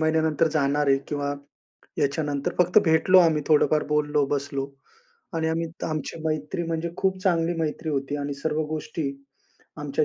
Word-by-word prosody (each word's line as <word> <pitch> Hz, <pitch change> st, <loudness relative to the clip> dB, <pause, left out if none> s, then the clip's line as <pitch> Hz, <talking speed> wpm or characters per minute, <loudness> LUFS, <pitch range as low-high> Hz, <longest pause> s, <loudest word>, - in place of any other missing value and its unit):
महिन्यानंतर 160 Hz, 0 st, +2 dB
जाणार 145 Hz, -1 st, +1 dB
आहे 135 Hz, -, +5 dB
किंवा 145 Hz, -1 st, -2 dB, 0.6 s
याच्यानंतर 145 Hz, 0 st, 0 dB
फक्त 180 Hz, +3 st, +5 dB
भेटलो 160 Hz, +3 st, +5 dB
आम्ही 160 Hz, -3 st, +3 dB
थोडंफार 150 Hz, 0 st, +4 dB
बोललो, 150 Hz, -1 st, +2 dB
बसलो 140 Hz, -1 st, -2 dB, 0.7 s
आणि 160 Hz, 0 st, 0 dB
आम्ही 165 Hz, +1 st, -1 dB, 0.2 s
आमची 155 Hz, +1 st, -4 dB
मैत्री 155 Hz, +2 st, -2 dB
म्हणजे 165 Hz, 0 st, -2 dB
खूप 190 Hz, -1 st, 0 dB
चांगली 170 Hz, -2 st, +2 dB
मैत्री 155 Hz, 0 st, -2 dB
होती 140 Hz, 0 st, -2 dB
आणि 145 Hz, 0 st, -3 dB
सर्व 155 Hz, +2 st, -1 dB
गोष्टी 155 Hz, -1 st, -3 dB, 0.7 s
आमच्या 145 Hz, +1 st, 0 dB
155 Hz, 145 wpm, -25 LUFS, 145-160 Hz, 0.7 s, आहे